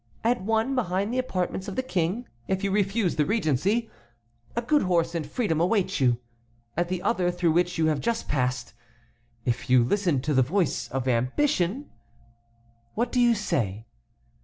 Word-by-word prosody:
At 240 0 +2
one, 225 +6 +1
behind 205 -3 0
the 255 - +1
apartments 190 -5 -2
of 195 - -5
the 260 - -1
King, 195 +1 -1 0.2
if 190 +1 -1
you 200 - 0
refuse 200 -2 +1
the 150 - +3
regency, 205 - +1 0.6
a 235 - -1
good 295 +5 +3
horse 175 -2 +1
and 165 -2 -1
freedom 165 -3 0
await 190 0 +1
you. 125 -3 +3 0.6
At 175 +1 0
the 185 -1 -2
other, 175 0 +1
through 175 -1 +1
which 175 +2 +1
you 160 - +2
have 155 -2 +1
just 230 -1 -1
passed, 125 -3 -1 0.7
if 120 0 -2
you 125 -1 +6
listen 175 +1 +1
to 150 +3 -1
the 130 - +5
voice 170 +7 0
of 135 0 -3
ambition—What 120 - -3
do 250 - +1
you 240 -1 +5
say?" 110 - -2
180 Hz, 165 wpm, -26 LUFS, 135-220 Hz, 0.7 s, you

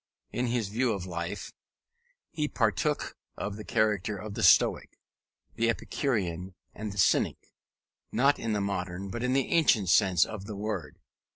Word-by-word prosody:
In 125 +1 -1
his 120 -4 -1
views 115 +2 +1
of 95 -2 -5
life 85 +2 -5 0.8
he 150 -3 -1
partook 130 +5 0 0.2
of 105 -1 -4
the 105 - -7
character 105 -2 0
of 105 +2 -7
the - - -4
Stoic, - - +5 0.6
the 115 0 +1
Epicurean, 95 - -2 0.2
and 110 0 -5
the 100 - -9
Cynic, 90 - +3 0.7
not 135 +5 +3
in 115 -1 -2
the 105 - 0
modern 95 -1 -3
but 120 - -4
the 130 +1 +1
ancient 135 - +3
sense 90 -4 +5
of 105 -3 -7
the 105 - -5
word. 100 -7 -4
105 Hz, 155 wpm, -29 LUFS, 95-120 Hz, 0.8 s, Stoic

